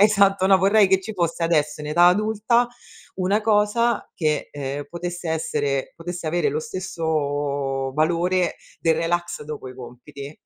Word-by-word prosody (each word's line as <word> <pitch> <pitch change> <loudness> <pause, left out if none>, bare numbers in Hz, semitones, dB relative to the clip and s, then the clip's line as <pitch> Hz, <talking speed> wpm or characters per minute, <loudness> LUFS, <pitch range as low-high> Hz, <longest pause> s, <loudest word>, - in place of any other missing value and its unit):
vorrei 205 - +7
tanto 195 -2 +3
no, 190 -1 +6
vorrei 195 +1 +4
che 190 0 +3
ci 210 +3 -7
fosse 170 -1 -1
adesso 150 -3 +1
in 150 - -6
età 170 +3 +4
adulta 220 +5 +2 0.5
una 195 +3 +1
cosa 220 +2 +1
che, 155 -3 -1
ehm, 140 0 -4
potesse 175 -1 -4
essere 145 -4 -1
potesse 170 0 -6
avere 170 0 +1
lo 150 +2 -2
stesso 145 -6 -2
valore 175 +3 +1 0.2
del 165 -1 +2
relax 175 -1 -2
dopo 150 -3 -7
i - - -12
compiti. 135 +4 -10
170 Hz, 155 wpm, -23 LUFS, 150-190 Hz, 0.5 s, vorrei